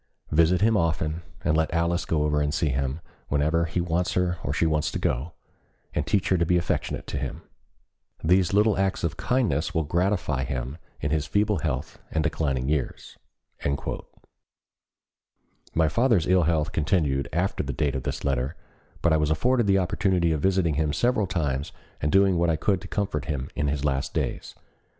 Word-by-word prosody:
Visit 85 +4 +4
him 110 +1 +4
often, 80 -2 0 0.2
and 75 - +2
let 80 0 +1
Alice 85 +1 0
go 75 -2 +1
over 75 0 +1
to 75 - 0
see 80 -1 0
him 70 +3 -2 0.3
whenever 80 +4 +1
he 85 +2 -2
wants 85 +1 0
her 90 -1 0
or 70 - -2
she 75 - +1
wants 75 -1 +1
to - - -4
go, 70 +7 -1 0.6
and 75 - -1
teach 100 +1 +1
her 95 - +3
to - - +3
be 90 +2 +3
affectionate 85 +1 -2
to - - -3
him. - - -5 0.8
These 90 +2 +3
little 105 0 +3
acts 95 -1 0
of 85 -2 -1
kindness 90 - 0
will 80 - +2
gratify 85 -4 0
him 65 +3 -4 0.2
in 75 - -1
his 75 -2 0
feeble 105 +3 +1
health 75 -1 -3
and 80 - 0
declining 70 -5 -1
years." 75 -3 -2 2.6
My 80 0 +4
father's 115 -3 +2
ill 90 -1 +4
health 80 0 +1
continued 75 -5 +1
after 90 +4 0
the - - -3
date 75 -4 0
of 65 - -2
this - - -4
letter, 70 +2 0 0.5
but 85 - +4
I - - +4
was 75 -1 +1
afforded 120 - +2
the 95 -1 +4
opportunity 95 -2 +1
of 75 -2 -1
visiting 95 -3 +2
him 75 0 0
several 120 +3 +1
times 70 -6 -1 0.3
and 75 - 0
doing 95 -2 +4
what 85 0 +2
I 80 - +3
could 95 +4 0
to - - -8
comfort 95 -8 -2
him 70 -4 -3
in 75 - 0
his 70 0 -1
last 70 -1 -1
days. - - -3
80 Hz, 185 wpm, -26 LUFS, 75-90 Hz, 2.6 s, Visit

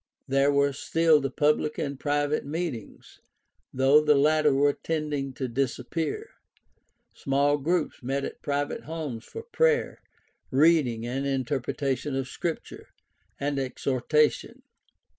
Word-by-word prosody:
There 135 +1 +3
were 140 0 +2
still 160 +2 +3
the 135 - -1
public 150 +1 +1
and 140 - -2
the 135 - -14
private 145 0 0
meetings, 150 - -6 0.5
though 135 +3 +5
the 150 -1 +4
latter 150 +1 +4
were 140 +1 +3
tending 150 -4 -3
to 130 +1 -3
disappear. 135 - -3 0.8
Small 140 +2 +1
groups 165 +2 -1
met 135 +2 -2
at - - -8
private 145 0 -2
homes 150 -8 -5
for 455 - -8
prayer, 475 0 +1 0.5
reading 135 -5 +3
and 135 +3 -2
interpretation 135 +1 -2
of 135 -1 -2
Scripture, 165 +4 -5 0.5
and 140 0 -1
exhortation. 135 +3 0
145 Hz, 120 wpm, -27 LUFS, 135-155 Hz, 0.8 s, though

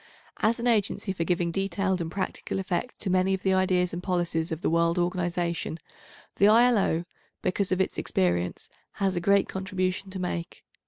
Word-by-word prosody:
As 225 +3 +2
an 235 - -3
agency 215 -4 +1
for 170 - -2
giving 175 0 0
detailed 195 0 -1
and 165 - -3
practical 195 0 -3
effect 195 +6 -2
to 190 - +1
many 185 +1 +3
of 190 - -9
the 190 - +3
ideas 185 -2 +2
and 175 - -4
policies 175 -3 -1
of 160 +1 -4
the - - +2
world 170 +1 +2
organisation, 175 -2 -1 0.6
the 200 - +6
I.L.O., 215 -7 +4 0.4
because 190 +1 0
of 185 - +1
its 190 - 0
experience, 90 -1 0 0.3
has 195 -2 0
a 175 - -1
great 200 +2 +3
contribution 190 0 -2
to 190 - -6
make. 175 -2 -4
185 Hz, 175 wpm, -27 LUFS, 175-195 Hz, 0.6 s, the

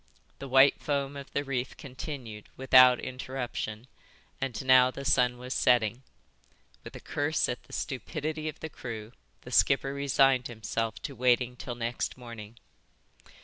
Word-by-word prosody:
The 140 - -7
white 135 +1 +5
foam 140 -1 -2
of 140 -1 -9
the 140 - -1
reef 130 -2 -3
continued 130 -6 -8
without 130 -1 +7
interruption 125 -4 -5 0.6
and 130 -2 -3
now 130 -1 +6
the 140 +2 -8
sun 125 -2 +3
was 125 +1 -5
setting. 120 0 +2 0.8
With - - -10
a - - -7
curse 145 +2 0
at 120 - -4
the - - -16
stupidity 155 +3 -4
of 155 - -10
the 160 - -5
crew 115 -6 -7 0.3
the - - -11
skipper 135 0 +3
resigned 135 -2 +3
himself 110 -2 -3
to 140 - -5
waiting 125 0 +2
till 120 0 -6
next 120 +2 -3
morning. 115 -3 -10
130 Hz, 145 wpm, -29 LUFS, 120-140 Hz, 0.8 s, without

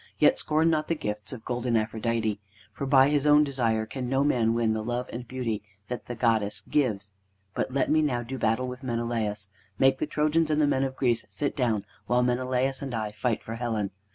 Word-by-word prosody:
Yet - - +5
scorn 155 +2 +2
not 155 -1 0
the 165 - +1
gifts 105 -7 -4
of 120 -4 -8
golden 120 -1 0
Aphrodite, 110 -1 -1 0.3
for 140 - -4
by 135 0 +6
his 145 0 +2
own 150 0 +7
desire 115 -6 0
can 125 +2 -5
no 135 +1 +2
man 115 -5 +2
win 115 -2 +2
the 110 - -2
love 120 +2 -2
and 120 +1 -6
beauty 115 -5 -2 0.3
that 125 - -5
the 120 - -4
goddess 110 -3 +1
gives. 105 -8 0 0.4
But - - -1
let 135 +1 0
me 155 0 +4
now 125 -6 0
do 130 +2 -6
battle 115 +4 +1
with 125 +1 -7
Menelaus. 115 -5 -2 0.3
Make 135 0 +4
the 155 - -1
Trojans 155 +2 +1
and 155 0 +2
the 150 - +4
men 135 -2 +2
of 130 -1 -2
Greece 120 -3 +1
sit 145 - -2
down, 115 -6 0 0.2
while 125 0 +3
Menelaus 130 +2 0
and 135 -3 -4
I 110 -2 -2
fight 110 +2 -1
for 110 - -6
Helen. 110 -4 -2
125 Hz, 210 wpm, -27 LUFS, 110-135 Hz, 0.4 s, own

